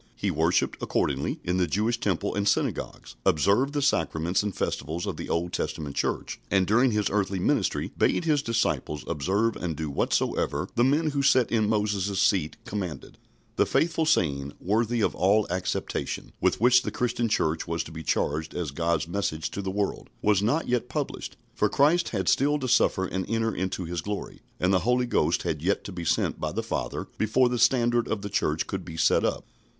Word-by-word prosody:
He - - -1
worshipped, - - +1
accordingly, - - -1
in 90 +1 0
the 90 -1 +2
Jewish 110 +8 0
temple 100 -1 -1
and 100 0 -1
synagogues, - - -2
observed 105 - +2
the 145 -1 0
sacraments 85 - +1
and 105 -2 -3
festivals 80 +5 -3
of - - -3
the - - -7
Old 85 +1 -1
Testament 75 -2 -3
Church, - - -2
and 95 -1 +3
during 120 +7 +4
His 105 -3 +1
earthly 100 -1 0
ministry 90 - 0
bade 175 - +1
His 150 -3 +2
disciples 115 - -1
observe 100 +10 0
and 85 -3 -3
do 75 -1 -4
whatsoever - - 0
the 120 - +2
men 150 +4 +2
who 140 -1 0
sat 130 -3 +3
in 110 -3 +2
Moses' 105 -3 0
seat 90 -6 +2
commanded. 90 -9 -5 0.4
"The - - +3
faithful 160 -1 +1
saying, 70 - +1
worthy 115 +4 0
of - - +1
all 100 +3 +3
acceptation," 90 +1 -3
with - - +2
which 125 +2 +5
the - - -3
Christian 120 -1 -1
Church 80 -5 0
was 85 0 -1
to 80 - -11
be 80 0 -7
charged 75 0 -1
as 85 -5 -3
God's 85 +1 0
message 85 -4 -2
to 100 - -4
the 95 - -3
world, 100 +1 -2
was 105 -2 +3
not 135 +10 +1
yet 125 0 0
published, 145 +1 -4 0.2
for - - +1
Christ 160 +5 +3
had 95 -5 -2
still 145 +2 +3
to 135 -3 -3
suffer 95 -5 +3
and 95 0 -2
enter 115 0 0
into 95 0 -3
His 85 0 -3
glory, 105 +2 -5 0.2
and 90 +2 +2
the 95 - +4
Holy 125 +6 +1
Ghost - - +1
had 75 -2 -2
yet 95 +4 0
to - - -7
be 85 -2 -6
sent - - 0
by - - -2
the - - -3
Father - - -3
before 120 +4 +3
the 125 -1 -1
standard 120 -1 +3
of 105 - -2
the 100 - -4
Church 80 -5 0
could 95 -2 -4
be 80 -2 -8
set - - +3
up. - - -1
100 Hz, 195 wpm, -26 LUFS, 85-120 Hz, 0.4 s, which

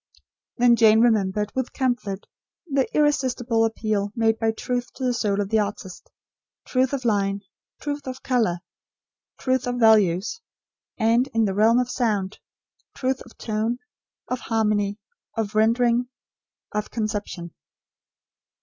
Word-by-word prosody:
Then 240 0 +5
Jane 220 -1 +6
remembered, 210 -3 +2
with 260 -1 -3
comfort, 240 -7 -2 0.4
the 275 -5 +1
irresistible 250 -6 +2
appeal 215 -2 -1
made 225 -1 +2
by 225 -1 +2
Truth 245 +2 -3
to 265 - -6
the 250 -1 +2
soul 205 -4 0
of 200 -1 -1
the 220 0 +3
artist; 200 -3 -5 0.6
truth 255 0 +1
of 270 -3 -3
line; 200 -2 +1 0.4
truth 290 -1 -4
of 260 0 -6
colour; 220 -9 +1 0.8
truth 260 -1 0
of 245 - -1
values; 220 - +3 0.6
and, 230 +3 +3
in 225 -1 +4
the 195 - 0
realm 220 +4 +4
of 250 0 +1
sound, 210 -6 -1 0.6
truth 260 0 -1
of 240 - -18
tone, 220 +2 -1 0.5
of 255 - -2
harmony, 210 -3 0 0.4
of 215 -2 -1
rendering, 235 +3 +2 0.6
of 210 0 -3
conception. 205 -6 -4
225 Hz, 130 wpm, -24 LUFS, 210-245 Hz, 0.8 s, Jane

